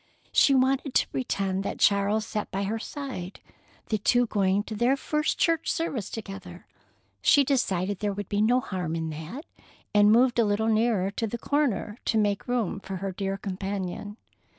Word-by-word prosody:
She 275 - +5
wanted 265 +1 +1
to - - +4
pretend 195 -6 -1
that 200 - -4
Charles 205 +2 +3
sat 210 -1 -4
by 195 +1 -2
her 220 +3 -2
side, 230 -9 -6 0.5
they 215 - +1
two 245 +4 +3
going 200 -2 +1
to 220 - -6
their 245 +5 +2
first 300 +2 -1
church 330 -1 +1
service 285 - -2
together. 195 -5 -8 0.6
She 285 - +5
decided 200 -8 0
there 205 -1 0
would 200 -1 -5
be 205 0 0
no 245 +4 +3
harm 180 -7 -3
in 160 -1 -3
that, 160 - -7 0.5
and 210 0 +6
moved 240 +2 +4
a - - +6
little 215 +1 +1
nearer 215 -4 +2
the 230 0 -2
corner 245 -6 -1
to 225 - +1
make 205 -2 0
room 240 -6 -1
for 195 0 -6
her 195 +1 -3
dear 195 +1 -3
companion. 195 +1 -4
210 Hz, 175 wpm, -27 LUFS, 195-245 Hz, 0.6 s, and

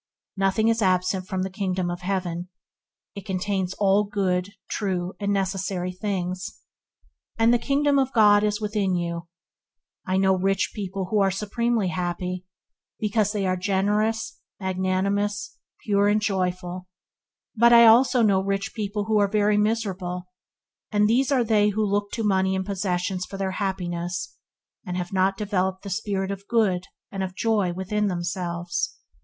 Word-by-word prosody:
Nothing 195 +3 +2
is 230 0 +2
absent 185 -1 +1
from 190 -2 -2
the 190 - -2
Kingdom 185 -2 -1
of 175 +1 -6
heaven; 180 -2 -3 0.6
it 200 - -8
contains 190 0 -2
all 200 0 +3
good, 195 -2 -1
true, 185 -3 -2
and 200 -1 -1
necessary 190 -2 -1
things, 185 -1 -4 0.7
and 225 +1 +4
"the 240 - +3
Kingdom 280 +2 +2
of 265 -1 +1
God 210 -3 +5
is 210 0 0
within 205 -3 0
you." 170 -1 -3 0.8
I 185 0 0
know 190 0 +4
rich 195 +1 0
people 195 -3 -4
who 215 - +3
are 195 -1 +4
supremely 215 +1 0
happy, 180 0 -3 0.5
because 210 -1 +1
they 205 -2 -1
are 185 0 +1
generous, 210 +4 0 0.2
magnanimous, 195 +2 -1 0.3
pure 200 -1 +3
and 210 +1 +3
joyful; 185 -3 -2 0.7
but 235 +1 +5
I 235 0 +9
also 240 +2 +6
know 195 -3 +4
rich 195 +3 -2
people 210 -1 -2
who 215 0 +2
are 200 - +4
very 210 0 +2
miserable, 195 -4 -1 0.7
and 210 0 +3
these 255 +5 +2
are 260 -3 +3
they 210 -2 +3
who 215 +1 0
looked 205 0 -1
to 225 - -2
money 190 -2 +2
and 190 0 -2
possessions 185 -1 -2
for 195 - -7
their 195 -1 -1
happiness, 180 -3 -3 0.5
and 180 0 -4
have 180 +1 -4
not 190 +1 +2
developed 190 -2 -1
the 200 - -6
spirit 195 -1 -2
of 200 0 -7
good 195 -6 +1 0.3
and 195 - -4
of 185 -1 -4
joy 210 -5 +1
within 200 +4 -1
themselves. 175 -1 -3
195 Hz, 155 wpm, -25 LUFS, 185-210 Hz, 0.8 s, I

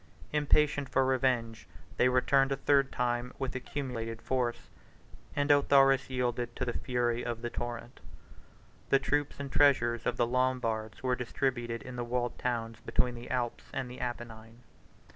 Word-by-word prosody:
Impatient 150 -1 +2
for 135 0 +2
revenge, 125 -4 0 0.3
they 125 - +4
returned 135 +2 +3
a - - +2
third 140 0 +2
time 120 0 -1
with 135 -2 -3
accumulated 125 -4 -4
force, 125 -1 -2 0.7
and 145 0 +2
Autharis 135 -2 +5
yielded 120 -2 -1
to 125 - -2
the 120 - -2
fury 120 -1 -1
of 120 -1 -4
the 120 - -3
torrent. 120 +1 -6 0.9
The 135 - +6
troops 145 +1 -1
and 140 -1 -5
treasures 120 -5 +3
of - - 0
the 120 - +3
Lombards 120 -3 -1
were 130 -1 +2
distributed 120 -1 -2
in 125 -1 -8
the 120 - -2
walled 120 0 -2
towns 115 -2 -2
between 125 +2 0
the 120 0 -9
Alps 120 -2 -2
and 130 -2 -4
the 125 - -9
Apennine. 115 -1 -6
125 Hz, 155 wpm, -31 LUFS, 120-135 Hz, 0.9 s, The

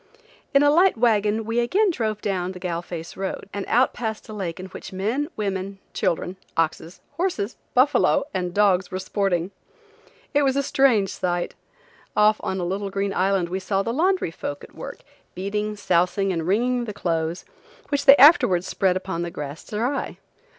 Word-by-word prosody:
In 275 +1 +5
a 290 - +5
light 355 -1 +4
wagon 220 -2 +2
we 230 +2 0
again 380 - +2
drove 220 -8 -2
down 185 -2 -1
Galle 180 -2 -3
Face 170 -1 -7
road, 190 0 -4
and 200 - -3
out 250 +3 +3
past 220 -2 -4
a 215 - -8
lake 185 -5 -4
in 185 - -6
which 190 - -9
men, 225 - -1
women, 195 -1 -3 0.2
children, 180 0 -1 0.2
oxen, 165 0 0 0.3
horses, 330 - -1 0.2
buffalo 280 +2 +4
and 180 -1 -2
dogs 190 -2 +2
were 185 - -4
sporting. 190 -2 -1 0.8
It 290 - +4
was 270 -2 +2
a 280 - +1
strange 245 -8 +3
sight. 175 -1 -2 0.6
Off 210 0 +5
on 190 - -3
a 175 - -2
little 195 +3 -2
green 195 0 -2
island 190 -2 +1
we 185 +2 -2
saw 195 +1 -1
the 230 - -2
laundry 360 - +1
folk 145 -3 -6
at - - -13
work, - - -8 0.3
beating, 210 +3 -2
sousing 185 0 +1
and 165 -1 -3
wringing 240 +5 +1
the 210 - -5
clothes, 165 -2 -2 0.4
which 285 -1 0
they 275 0 +9
afterwards 255 - +6
spread 185 -1 +1
upon 185 -2 -4
the 175 - -2
grass 145 -1 -7
to - - -8
dry. 245 +6 -2
200 Hz, 180 wpm, -23 LUFS, 180-235 Hz, 0.8 s, they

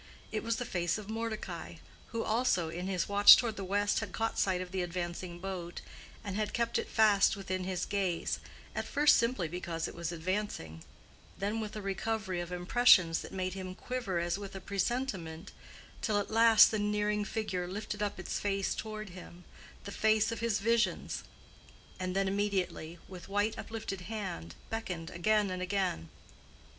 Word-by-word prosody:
It 215 0 -1
was 230 0 0
the 245 - -3
face 175 -4 0
of 210 0 -7
Mordecai, 225 -1 -4 0.3
who 230 -1 -3
also, 215 -8 +1
in 175 +3 -4
his 185 -3 0
watch 205 0 +10
toward 230 -3 -1
the 195 - -5
west, 205 +2 +1
had - - -5
caught 225 0 -1
sight 185 -2 +2
of 180 -1 -5
the 190 -1 -1
advancing 175 0 -4
boat, 175 -2 -5 0.4
and 200 -3 -4
had 210 0 -1
kept 235 -1 +1
it - - -4
fast 210 -3 +5
within 185 -2 -3
his 185 -2 -2
gaze, 190 -4 -1 0.3
at - - -3
first 295 0 +5
simply 230 -7 +1
because 170 0 -3
it - - -8
was 170 0 -4
advancing, 170 - -3 0.5
then 205 +3 -1
with 215 -1 -5
a 210 - -5
recovery 195 -1 -2
of 175 0 -6
impressions 180 -2 +5
that - - -9
made 185 -1 -2
him 185 -1 -6
quiver 240 -6 -3
as 170 +2 0
with 200 -1 -7
a - - -4
presentiment, 195 -4 -2 0.5
till 215 -2 +1
at 205 - -2
last 225 0 +7
the 215 - 0
nearing 210 0 +1
figure 200 -4 -2
lifted 210 +2 -5
up 205 -1 -2
its - - -3
face 195 -1 0
toward 215 -2 -5
him—the 180 +2 -12
face 215 +1 +3
of 230 - -4
his 230 -2 +1
visions—and 205 -4 -3
then 195 0 +2
immediately, 190 -4 -1
with 185 0 -10
white 205 +2 +1
uplifted 210 -4 -5
hand, 180 - -5 0.2
beckoned 180 -7 -4
again 210 +3 +2
and 185 0 -3
again. 185 - -1
195 Hz, 170 wpm, -32 LUFS, 180-215 Hz, 0.5 s, watch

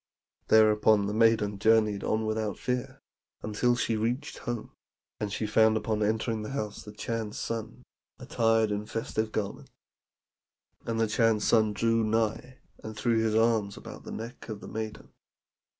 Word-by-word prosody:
"Thereupon 110 -1 +5
the 105 - -2
maiden 110 -2 +3
journeyed 110 -1 +3
on 110 0 0
without 110 -2 -2
fear 125 -1 -3 0.4
until 115 +3 +1
she 115 -1 0
reached 115 +5 -2
home; 120 -2 -5 0.5
and 105 -1 -3
she 110 - -2
found 110 +1 +4
upon 110 0 -1
entering 110 +1 0
the 105 +5 -6
house 105 -7 -4
the 105 - -10
Chan's 110 0 -4
son, 115 -1 -5 0.3
attired 115 -1 +1
in 105 +1 -3
festive 110 -1 -2
garments. 105 -2 -4 1.2
And 115 -1 -1
the 115 - +3
Chan's 110 -1 +2
son 110 -2 +3
drew 115 +2 +2
nigh, 115 +4 -1 0.2
and 110 0 -7
threw 115 0 +2
his 110 -1 +1
arms 110 -3 +2
about - - -10
the - - -8
neck 115 +1 -8
of 110 -2 -5
the - - -10
maiden." 110 -1 -6
110 Hz, 155 wpm, -28 LUFS, 105-115 Hz, 1.2 s, Thereupon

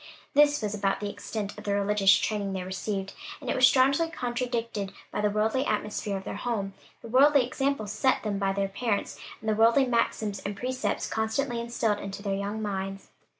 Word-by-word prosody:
This 290 -2 +4
was 210 -1 -1
about 195 -2 0
the 205 -1 -3
extent 205 0 -5
of - - -10
the 200 -1 0
religious 200 -1 +4
training 205 -2 -1
they 190 -1 -3
received; 195 +1 -4 0.3
and - - -3
it - - 0
was 255 0 +7
strongly 275 +5 +3
counteracted 240 -7 -3 0.2
by - - -2
the 210 - +2
worldly 220 +5 +1
atmosphere 210 -4 -2
of 190 - -7
their - - -5
home, 205 -4 -2 0.3
the - - -7
worldly 270 +2 +5
example 270 -2 -1
set 260 +6 +1
them 205 -2 -2
by 195 -1 +1
their 195 0 0
parents, 205 +1 -2 0.2
and 220 - -8
the 215 - +3
worldly 230 +5 +5
maxims 220 -4 0
and 200 0 -5
precepts 255 +1 -2
constantly 235 +3 -1
instilled 230 -3 0
into 200 0 -6
their 200 -2 -1
young 200 +2 -3
minds. 195 -1 -4
210 Hz, 195 wpm, -28 LUFS, 200-245 Hz, 0.3 s, was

